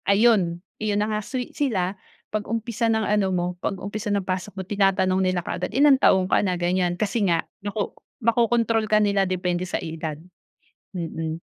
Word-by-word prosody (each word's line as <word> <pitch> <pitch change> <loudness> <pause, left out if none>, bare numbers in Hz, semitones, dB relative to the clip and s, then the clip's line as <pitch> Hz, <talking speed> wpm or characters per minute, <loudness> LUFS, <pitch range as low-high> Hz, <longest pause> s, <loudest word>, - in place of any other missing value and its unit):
Ayun! 200 -5 +3 0.2
Yun 210 -1 0
na 210 +1 +1
nga 210 - -1
sweet 250 +3 -5
sila 195 -10 0 0.4
'pag 215 -1 -2
umpisa 230 0 -1
ng 220 -1 +1
ano 210 -2 +2
mo, 180 -2 0 0.2
'pag 195 - -1
umpisa 210 +3 -5
ng 200 -1 +1
pasok 185 +1 -3
mo 190 - -3
tinatanong 190 -1 +2
nila 185 -2 +1
kaagad, 180 - -3
"Ilang 280 -1 +6
taon 190 -1 +5
ka - - +4
na?" 185 -3 0
Ganyan. 175 0 0
Kasi 210 0 0
nga, 170 -2 +2 0.2
nako 205 +1 -3 0.3
makokontrol 230 -1 +2
ka 215 - +5
nila 200 -1 +2
depende 180 0 -1
sa - - -1
edad. 160 -2 -5 0.8
Mm. 165 -2 -4
195 Hz, 175 wpm, -24 LUFS, 180-215 Hz, 0.8 s, Ilang